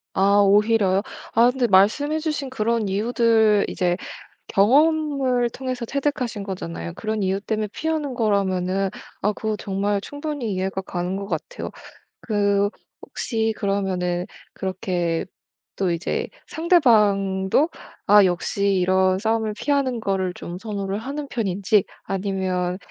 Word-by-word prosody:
아 200 +1 +4
오히려요. 200 -1 +4 0.3
아 235 +2 +6
근데 250 -1 0
말씀해 230 +11 +3
주신 300 -4 -3
그런 230 -3 0
이유들 220 0 +3
이제 175 -1 0 0.5
경험을 270 +1 +3
통해서 255 -1 -4
체득하신 260 -5 -2
거잖아요. 85 - -5
그런 215 -1 -3
이유 190 +1 0
때문에 215 -1 -2
피하는 310 -4 -2
거라면은 195 -4 +1 0.3
아 210 - +1
그거 220 +1 -2
정말 200 0 -1
충분히 290 -2 -4
이해가 190 +1 -2
가는 180 0 -3
것 200 0 -5
같아요. 165 -6 -5 0.5
그 205 -2 +1 0.3
혹시 225 -2 -2
그러면은 185 -3 -1 0.3
그렇게 180 -3 -2 0.5
또 190 -2 0
이제 170 +2 -2 0.2
상대방도 215 - +3 0.4
아 205 0 +7
역시 195 +2 0
이런 185 0 +3
싸움을 220 +1 0
피하는 270 -2 0
거를 190 -3 -1
좀 175 +1 -7
선호를 200 -1 -3
하는 280 +4 -5
편인지 200 -2 +1 0.2
아니면 185 -2 -2
205 Hz, 280 characters per minute, -23 LUFS, 190-240 Hz, 0.5 s, 아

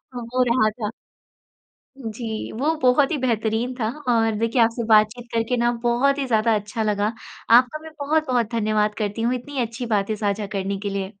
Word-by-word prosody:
वो 245 +1 0
रहा 235 -3 +3
था। 215 -1 -5 1.1
जी, 225 -2 -5
वो 295 +8 0
बहुत 255 +2 +4
ही - - +1
बेहतरीन 230 0 -1
था 225 -3 -2 0.2
और 225 -2 +2
देखिए 230 +2 +1
आपसे 230 +1 +1
बातचीत 220 +3 +3
करके 230 +2 0
ना, 240 0 +2
बहुत 260 +4 +2
ही 275 - 0
ज़्यादा 225 -1 +2
अच्छा 210 +2 -3
लगा। 210 +1 0 0.4
आपका 250 +5 +5
भी 320 - -9
बहुत-बहुत 280 -6 +1
धन्यवाद 215 -1 +1
करती 215 0 -3
हूँ 245 +2 +1
इतनी 265 +2 -4
अच्छी 235 +2 -4
बातें 215 -1 0
साझा 205 0 -1
करने 195 +1 -2
के 205 -1 -3
लिए। 195 +1 -4
230 Hz, 175 wpm, -23 LUFS, 215-250 Hz, 1.1 s, आपका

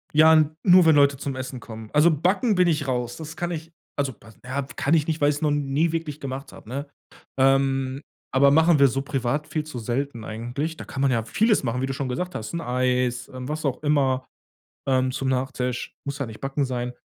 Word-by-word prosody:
Ja, 160 +1 +7
n 155 0 +3
nur 180 -2 +7
wenn 160 -2 +6
Leute 140 -1 +4
zum 140 0 -4
Essen 130 0 -5
kommen. 110 -2 -9
Also 150 +3 +5
Backen 190 - +1
bin 180 -1 +4
ich 150 -4 0
raus. 125 -2 -2
Das 155 -1 -8
kann 175 0 -2
ich, 165 0 -6 0.3
also 140 -2 0
Ba 110 0 -17
ja, 130 +2 -2
kann 145 - +1
ich 155 -3 +3
nicht, 160 -1 -2
weil 145 - +5
ich's 145 0 -2
noch 150 -2 +2
nie 145 +3 +1
wirklich 160 -3 -3
gemacht 135 0 -6
hab, - - -14
ne? 140 +4 -5 0.5
Ähm, 135 0 +2 0.3
aber 140 +1 +5
machen 160 +1 +5
wir 140 - +7
so 135 +2 -1
privat 135 +2 -2
viel 155 - -2
zu 150 -5 -7
selten 120 +1 -3
eigentlich. 120 +9 -4
Da - - -8
kann 135 - -5
man 135 -1 +3
ja 115 -3 +1
vieles 215 - +2
machen, 125 0 -1
wie - - +1
du 135 - -3
schon 135 -1 -3
gesagt 180 +8 -3
hast, 110 -1 -5
'n 170 - -2
Eis, 125 -1 0
ähm, 130 0 -6
was 155 +1 -3
auch 135 +1 -2
immer, 135 -3 +1 0.6
ähm, 130 -1 +2
zum 135 +1 -2
Nachtisch, 125 -1 -2
muss 140 0 -4
ja 140 - -2
nicht 110 -1 -10
Backen 135 +1 -1
sein. 125 -1 -3
140 Hz, 230 wpm, -24 LUFS, 130-155 Hz, 0.6 s, Ja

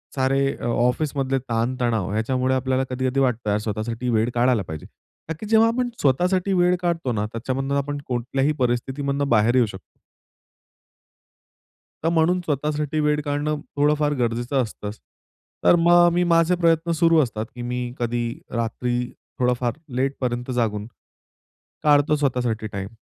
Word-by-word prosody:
सारे 135 +1 +1
अ, - - -7
ऑफिसमधले 135 +3 0
ताण-तणाव 120 -4 -1
ह्याच्यामुळे 130 +4 0
आपल्याला 130 0 0
कधी-कधी 130 +1 -1
वाटतं 120 -5 0
यार 105 +1 +1
स्वतःसाठी 115 +3 -3
वेळ 115 +1 +2
काढायला 120 -2 +3
पाहिजे. 80 -1 -7 0.4
ताकी 165 +7 -5
जेव्हा 225 +1 +5
आपण 245 +1 -1
स्वतःसाठी 180 +8 +2
वेळ 180 0 +3
काढतो 165 -7 -1
ना 105 0 -1
त्याच्यामधून 135 +4 -2
आपण 145 +1 -2
कोणत्याही 130 +4 0
परिस्थितीमधून 140 +3 -1
बाहेर 115 +2 +3
येऊ 125 -2 +5
शकतो. 95 -2 -9 2.2
तर 165 - +2
म्हणून 170 +2 +2
स्वतःसाठी 150 +1 -1
वेळ 150 0 +1
काढणं 145 +1 -1 0.2
थोडं 145 +1 +3
फार 150 -1 +1
गरजेचं 120 +3 0
असतंच 105 -2 -6 0.6
तर - - +6
मग 175 +1 +6
मी 175 0 +2
माझे 170 +1 +3
प्रयत्न 165 -1 +2
सुरु 165 -2 +5
असतात 110 -2 -4
की 120 - -7
मी 125 0 -3
कधी 120 0 -1 0.3
रात्री 120 +1 -1 0.4
थोडंफार 125 -1 +1 0.2
लेटपर्यंत 130 -2 -2
जागून 110 -3 -1 1.0
काढतो 145 0 +4
स्वतःसाठी 125 -6 -1
टाईम. 100 -2 -5
130 Hz, 140 wpm, -23 LUFS, 120-150 Hz, 2.2 s, तर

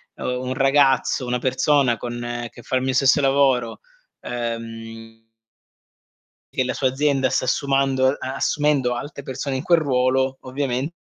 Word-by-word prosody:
un 125 +1 -3
ragazzo, 135 -1 +2
una 125 0 0
persona 130 0 +2
con 120 0 -5
che 120 - -14
fa 130 - -1
il - - -1
mio 130 0 -1
stesso 135 +2 +4
lavoro, 135 -4 +2 0.4
ehm 115 -1 -6 1.3
che 130 - +1
la 125 - -2
sua 130 - +1
azienda 135 -1 +1
sta - - 0
assumando 135 0 +1
ehm, 140 - 0 0.2
assumendo 140 -3 +1
altre 140 +3 -7
persone 135 +1 -4
in 130 - -3
quel 170 -2 +3
ruolo, 130 -1 +1
ovviamente 135 +3 -3
130 Hz, 140 wpm, -22 LUFS, 120-135 Hz, 1.3 s, stesso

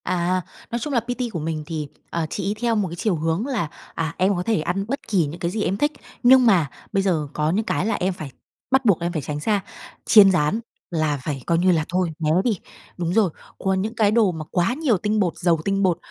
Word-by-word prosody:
À, 180 +1 0 0.3
nói 235 - -1
chung 295 +3 -4
là 240 - +4
PT 245 +1 -3
của 170 - -2
mình 155 0 -3
thì, 155 -2 -4 0.2
ờ, 170 -1 -1
chị - - -3
ấy 205 - +1
theo 235 -1 +2
một 205 -3 +1
cái 170 - -6
chiều 185 +2 0
hướng 165 +6 -1
là, 245 - -1 0.3
à: 165 0 -2
"Em 190 +2 +2
có 175 - -2
thể 220 -5 +1
ăn 180 +5 -1
bất 275 +4 -2
kỳ 190 -7 +2
những 155 +4 -7
cái 170 0 -1
gì 210 +1 -1
em 190 +3 0
thích, 295 +6 +1 0.3
nhưng 255 +1 +7
mà 180 - +4 0.2
bây 195 - +1
giờ 165 -6 +1
có 150 +1 0
những 210 +5 0
cái - - 0
là 225 - +1
em 185 +1 0
phải 155 -6 -8 0.4
bắt 265 -1 +3
buộc 200 -7 +4
em 170 +1 -1
phải 155 - -1
tránh 145 +1 -4
xa, 205 +5 +1 0.4
chiên 200 -3 +8
rán 180 +4 +1 0.3
là 155 -3 0
phải 140 -2 -3
coi 170 - +3
như 180 +2 +4
là 160 -3 +1
thôi, 180 -1 0
né 155 -2 0
đi." 215 -7 0 0.4
Đúng 175 -1 -1
rồi, 210 -3 +4 0.3
còn 190 -1 0
những 220 +4 -3
cái 215 -2 +3
đồ 215 -4 +4
mà 160 -2 -6
quá 180 +6 +1
nhiều 270 -7 +1
tinh 210 +3 0
bột, 180 -5 0
giàu 170 -2 +2
tinh 195 0 +1
bột, 180 -3 +2
185 Hz, 255 wpm, -23 LUFS, 165-215 Hz, 0.4 s, chiên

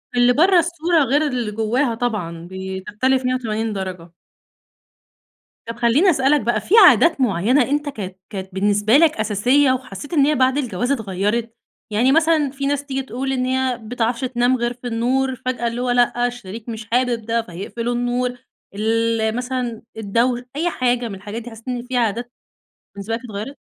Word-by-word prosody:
اللي 245 0 +5
برّه 355 +6 +5
الصورة 340 -1 +1
غير 290 +4 +2
اللي 245 -6 -2
جواها 230 +4 0
طبعًا، 180 -8 -3
بتختلف 195 +8 -2
180 225 -4 -1
درجة. 180 -3 -6 1.6
طب 230 - -5
خليني 240 - +3
أسألك 280 -2 +3
بقى 235 - 0
في 395 - -4 0.2
عادات 320 -5 +3
معينة 240 +4 +2
أنت 290 +1 0
كانت 190 -8 -7
كانت 190 -2 -6
بالنسبة 205 +5 +3
لك 320 0 +5
أساسية 245 +7 +3
وحسيت 255 - -5
إن 285 -4 +4
هي 300 +1 +2
بعد 260 +1 +2
الجواز 245 -2 -1
اتغيرت؟ 220 0 -1 0.4
يعني 240 +6 +3
مثلًا 315 -2 +3
في 275 0 -4
ناس 285 0 -1
تيجي 270 -1 -2
تقول 265 +1 -4
إن 255 -1 0
هي 260 0 0
ما 260 -1 0
بتعرفش 235 +1 -1
تنام 250 0 +1
غير 240 0 -1
فى 245 0 -9
النور 255 +3 0
فجأة 245 -2 -1
اللي 235 +1 -3
هو 250 - -1
لأ، 245 0 +2
الشريك 230 -2 -8
مش 220 -1 -6
حابب 245 -2 +1
ده 230 +1 0
فيقفل 220 +5 -5
النور، 245 +1 -1 0.4
ال 225 +1 0
مثلًا 250 -2 -3 0.2
الدوش 235 +4 +1 0.2
أي 335 +4 0
حاجة 245 -5 0
من 205 - -6
الحاجات 205 +4 -7
دي 240 - -9
حسيت 225 +2 -14
إن 245 -1 -3
في 260 - -2
عادات 240 +1 -1 0.6
بالنسبة 200 +3 -4
لك 230 - -3
اتغيرت؟ 220 +5 -6
245 Hz, 170 wpm, -20 LUFS, 220-260 Hz, 1.6 s, اللي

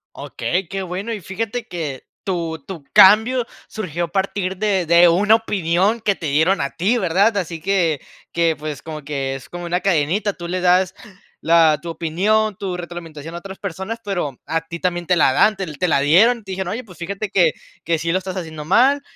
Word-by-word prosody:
Okey, 180 0 -3
qué 195 +2 -4
bueno, 190 +5 -4
y 210 - -5
fíjate 225 +6 -4
que 150 -7 -5 0.2
tu 170 -4 -2
tu 170 -7 -7
cambio 225 +5 +6 0.2
surgió 175 -5 -3
a - - -10
partir 190 0 -2
de 195 -4 +1
de 170 +1 +7
una 205 +6 +5
opinión 200 0 0
que 205 -2 +1
te 170 - -8
dieron 160 +7 +2
a 140 - -2
ti, 210 +8 +1
¿verdad? 200 +3 +2
Así 165 -4 -3
que 170 -6 +1 0.3
que, 165 -1 +1
pues, 150 -2 -6
como 155 -2 -7
que 135 -2 -3
es 135 - -10
como 175 0 -7
una 175 +1 -1
cadenita, 190 +3 +1
tú 170 -1 -8
le 180 +1 -2
das 180 0 +3 0.5
la 165 -2 +4
tu 170 - -7
opinión, 200 +6 0
tu 190 -2 -4
retroalimentación 170 -2 -8
a - - -4
otras 195 +2 -9
personas, 195 +4 -5
pero 175 -10 -3
a 165 0 0
ti 170 0 -6
también 175 -1 -1
te 180 - +3
la 150 -5 +4
dan 215 +10 +4
te 190 - -4
te 180 - 0
la 140 - +3
dieron. 210 - +4
Te 195 - -8
dijeron: 185 -1 -3
"Oye, 250 +3 -4
pues, 185 -5 -15
fíjate 200 +4 -4
que 175 -4 +3 0.3
que 165 -1 0
sí 165 +1 -1
lo 185 - +2
estás 190 0 -5
haciendo 160 -4 -6
mal 260 - +4
180 Hz, 205 wpm, -20 LUFS, 165-200 Hz, 0.5 s, de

